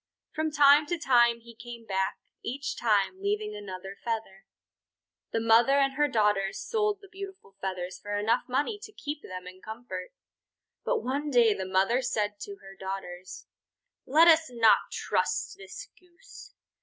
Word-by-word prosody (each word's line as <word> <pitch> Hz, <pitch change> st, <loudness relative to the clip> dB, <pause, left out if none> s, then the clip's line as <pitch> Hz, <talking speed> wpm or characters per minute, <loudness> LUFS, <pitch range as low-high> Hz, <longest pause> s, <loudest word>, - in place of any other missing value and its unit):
From 315 Hz, 0 st, -1 dB
time 295 Hz, 0 st, +6 dB
to 345 Hz, -, -1 dB
time 240 Hz, -6 st, +4 dB
he 235 Hz, 0 st, -13 dB
came 235 Hz, 0 st, -10 dB
back, 190 Hz, -2 st, -1 dB, 0.3 s
each 275 Hz, +5 st, -3 dB
time 220 Hz, -, +1 dB
leaving 420 Hz, +1 st, -1 dB
another 195 Hz, -1 st, -7 dB
feather. 215 Hz, -4 st, -4 dB, 0.8 s
The 225 Hz, -, 0 dB
mother 230 Hz, +5 st, +5 dB
and 275 Hz, -1 st, +3 dB
her 295 Hz, +2 st, +2 dB
daughters 210 Hz, -5 st, +1 dB
sold 425 Hz, -4 st, -1 dB
the 395 Hz, -, -13 dB
beautiful 380 Hz, -, -10 dB
feathers 185 Hz, -1 st, -4 dB
for 205 Hz, 0 st, -3 dB
enough 225 Hz, +5 st, +1 dB
money 295 Hz, -, 0 dB
to 435 Hz, -, -9 dB
keep 295 Hz, -6 st, -6 dB
them 185 Hz, 0 st, -8 dB
in 185 Hz, +1 st, -11 dB
comfort. 235 Hz, -, -7 dB, 0.7 s
But -, -, 0 dB
one 285 Hz, +3 st, -2 dB
day 240 Hz, -5 st, +5 dB
the 190 Hz, -2 st, -5 dB
mother 195 Hz, +7 st, +2 dB
said 210 Hz, -5 st, -1 dB
to 405 Hz, -, -7 dB
her 195 Hz, 0 st, -12 dB
daughters: 190 Hz, -2 st, -7 dB, 0.6 s
"Let 320 Hz, +5 st, +6 dB
us 325 Hz, -1 st, +6 dB
not 230 Hz, -2 st, +4 dB
trust -, -, -1 dB
this -, -, -9 dB
Goose. 365 Hz, +8 st, -16 dB
240 Hz, 155 wpm, -28 LUFS, 200-315 Hz, 0.8 s, time